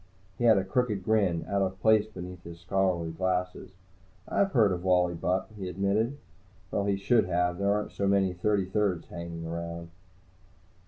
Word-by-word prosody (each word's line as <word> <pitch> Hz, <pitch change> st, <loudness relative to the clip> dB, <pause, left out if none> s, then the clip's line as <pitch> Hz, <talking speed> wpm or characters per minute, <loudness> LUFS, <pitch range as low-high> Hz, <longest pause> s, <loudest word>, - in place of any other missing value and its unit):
He 120 Hz, -, +1 dB
had 110 Hz, -3 st, +6 dB
a 95 Hz, -, +2 dB
crooked 105 Hz, 0 st, -1 dB
grin, 95 Hz, -6 st, +1 dB
out 100 Hz, 0 st, 0 dB
of 95 Hz, 0 st, -2 dB
place 110 Hz, +1 st, +4 dB
beneath 90 Hz, -4 st, -9 dB
his 85 Hz, 0 st, -10 dB
scholarly 90 Hz, -2 st, 0 dB
glasses. 90 Hz, +1 st, -2 dB, 0.6 s
"I've 195 Hz, -1 st, +1 dB
heard 110 Hz, -6 st, +4 dB
of 90 Hz, -1 st, -3 dB
Wally 90 Hz, -1 st, +3 dB
Bupp," 90 Hz, +4 st, -1 dB
he 95 Hz, -3 st, -5 dB
admitted. 100 Hz, +8 st, 0 dB, 0.5 s
Well, 100 Hz, -, 0 dB
he 100 Hz, -1 st, +1 dB
should 110 Hz, +4 st, +3 dB
have. 90 Hz, 0 st, 0 dB
There 100 Hz, 0 st, +2 dB
aren't 105 Hz, +1 st, -1 dB
so 100 Hz, -, -1 dB
many 100 Hz, -2 st, +2 dB
Thirty 95 Hz, +2 st, +1 dB
thirds 95 Hz, -2 st, -1 dB
hanging 85 Hz, -1 st, -6 dB
around. 85 Hz, 0 st, -5 dB
95 Hz, 170 wpm, -28 LUFS, 90-100 Hz, 0.6 s, had